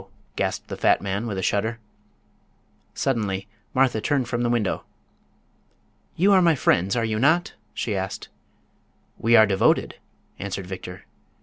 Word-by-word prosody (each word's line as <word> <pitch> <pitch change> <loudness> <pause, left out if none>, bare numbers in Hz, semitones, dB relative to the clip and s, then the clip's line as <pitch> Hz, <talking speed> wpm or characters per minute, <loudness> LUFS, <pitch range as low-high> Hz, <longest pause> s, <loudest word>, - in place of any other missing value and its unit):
gasped - - -2
the - - -5
fat - - +3
man, 100 +3 -3
with 100 -4 -4
a 95 - -3
shudder. 110 +5 0 1.2
Suddenly 105 -7 -1 0.3
Martha 130 -4 +2
turned 135 -1 0
from 120 0 -2
the 120 - +1
window. 115 -5 0 1.3
"You 195 +4 +4
are 190 - +6
my 170 -3 +4
friends, 95 -6 +2
are 115 -1 +1
you 110 -1 -1
not?" 160 +7 +2 0.2
she 105 - -2
asked. 95 +1 -4 0.9
"We 115 +1 +4
are 110 - +8
devoted!" 95 -2 +1 0.4
answered 95 -1 -4
Victor. 90 -1 -8
110 Hz, 140 wpm, -24 LUFS, 100-130 Hz, 1.3 s, are